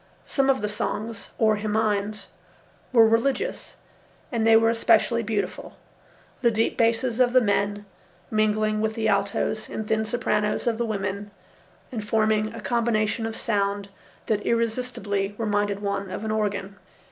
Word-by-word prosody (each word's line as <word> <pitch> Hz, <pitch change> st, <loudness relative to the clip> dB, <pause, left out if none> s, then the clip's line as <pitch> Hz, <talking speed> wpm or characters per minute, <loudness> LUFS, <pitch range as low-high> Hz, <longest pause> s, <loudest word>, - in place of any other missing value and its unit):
Some 275 Hz, -1 st, +1 dB
of 260 Hz, -6 st, +2 dB
the -, -, +1 dB
songs, 210 Hz, +1 st, -4 dB
or 215 Hz, -2 st, +3 dB
himines, 210 Hz, 0 st, -1 dB, 0.7 s
were 230 Hz, -3 st, +7 dB
religious, 270 Hz, -, 0 dB, 0.6 s
and 225 Hz, -3 st, +1 dB
they 225 Hz, -, +7 dB
were 225 Hz, 0 st, +5 dB
especially 230 Hz, 0 st, +3 dB
beautiful, 215 Hz, -2 st, -3 dB, 0.6 s
the 235 Hz, -, +4 dB
deep 225 Hz, 0 st, 0 dB
basses 230 Hz, +1 st, +1 dB
of 250 Hz, -1 st, +4 dB
the 255 Hz, -, +7 dB
men 205 Hz, -2 st, 0 dB, 0.5 s
mingling 215 Hz, 0 st, +1 dB
with 220 Hz, 0 st, -1 dB
the 225 Hz, -1 st, 0 dB
altos 200 Hz, +1 st, 0 dB
and 220 Hz, -, -5 dB
thin 220 Hz, 0 st, +1 dB
sopranos 215 Hz, -2 st, 0 dB
of 235 Hz, -2 st, 0 dB
the 235 Hz, -, 0 dB
women 200 Hz, -1 st, -3 dB, 0.6 s
and 225 Hz, -4 st, -4 dB
forming 215 Hz, 0 st, +1 dB
a -, -, -7 dB
combination 225 Hz, -1 st, 0 dB
of 225 Hz, -, -6 dB
sound 200 Hz, -2 st, -1 dB, 0.4 s
that 210 Hz, -2 st, 0 dB
irresistibly 225 Hz, -4 st, -1 dB
reminded 205 Hz, -2 st, -1 dB
one 200 Hz, -1 st, -2 dB
of 210 Hz, -, -5 dB
an 215 Hz, -, -1 dB
organ. 200 Hz, -2 st, -2 dB
215 Hz, 145 wpm, -25 LUFS, 205-230 Hz, 0.7 s, were